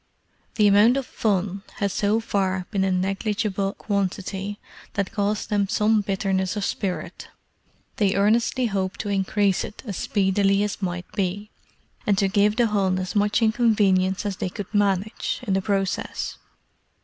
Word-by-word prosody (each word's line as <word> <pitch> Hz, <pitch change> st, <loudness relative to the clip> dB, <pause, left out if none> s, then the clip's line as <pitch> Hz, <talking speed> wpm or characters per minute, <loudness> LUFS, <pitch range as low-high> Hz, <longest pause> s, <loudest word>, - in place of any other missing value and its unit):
The 210 Hz, -, +4 dB
amount 205 Hz, +5 st, +6 dB
of 270 Hz, -, -2 dB
"fun" 195 Hz, -4 st, -1 dB
had 200 Hz, -1 st, -1 dB
so 205 Hz, +4 st, +1 dB
far 190 Hz, -4 st, -1 dB
been 195 Hz, -3 st, +1 dB
a 190 Hz, -, +1 dB
negligible 195 Hz, +1 st, -1 dB
quantity 200 Hz, 0 st, -3 dB, 0.4 s
which 200 Hz, -2 st, -1 dB
caused 210 Hz, +1 st, -1 dB
them 200 Hz, -1 st, +2 dB
some 215 Hz, +2 st, +2 dB
bitterness 190 Hz, -1 st, -1 dB
of 205 Hz, -2 st, -1 dB
spirit. 190 Hz, -3 st, -4 dB, 0.7 s
They 200 Hz, -3 st, +2 dB
earnestly 230 Hz, +5 st, +2 dB
hoped 195 Hz, -3 st, -2 dB
to 205 Hz, -, -4 dB
increase 195 Hz, 0 st, +1 dB
it -, -, -8 dB
as 200 Hz, -6 st, -4 dB
speedily 195 Hz, 0 st, +2 dB
as 210 Hz, 0 st, -3 dB
might 180 Hz, -1 st, -3 dB
be, 205 Hz, +1 st, -2 dB, 0.6 s
and 200 Hz, -2 st, +3 dB
to 195 Hz, -, +3 dB
give 205 Hz, +2 st, +2 dB
the 240 Hz, 0 st, +3 dB
Hun 195 Hz, -4 st, +1 dB
as 185 Hz, +1 st, -4 dB
much 205 Hz, +2 st, +2 dB
inconvenience 210 Hz, -5 st, +2 dB
as 200 Hz, -2 st, -2 dB
they -, -, -2 dB
could 200 Hz, +3 st, -7 dB
manage 205 Hz, 0 st, 0 dB
in 200 Hz, -, 0 dB
the 190 Hz, -, +2 dB
process. 195 Hz, -1 st, -2 dB
200 Hz, 155 wpm, -24 LUFS, 190-210 Hz, 0.7 s, amount